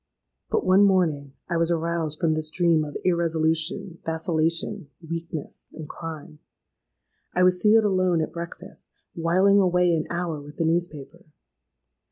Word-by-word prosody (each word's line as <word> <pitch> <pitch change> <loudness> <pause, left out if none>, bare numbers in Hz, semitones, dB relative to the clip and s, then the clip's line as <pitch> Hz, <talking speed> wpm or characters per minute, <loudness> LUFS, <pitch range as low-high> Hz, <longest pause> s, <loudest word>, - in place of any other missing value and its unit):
"But - - 0
one 185 +2 +5
morning 160 -8 +2
I 170 - -1
was 165 0 +1
aroused 165 -2 -1
from 165 -3 +2
this 155 0 -1
dream 165 -1 +2
of 150 -1 -5
irresolution—vacillation—weakness—and 165 -1 -2
crime. 160 -2 -8 1.0
I 180 - +3
was 180 0 +3
seated 220 +1 +5
alone 185 -4 +2
at - - -6
breakfast, 170 0 -9 0.2
whiling 185 +4 +3
away 180 -2 +3
an 155 -1 -1
hour 170 -3 -3
with 145 +1 -13
the 165 - 0
newspaper. 170 0 -2
170 Hz, 125 wpm, -25 LUFS, 160-180 Hz, 1.0 s, one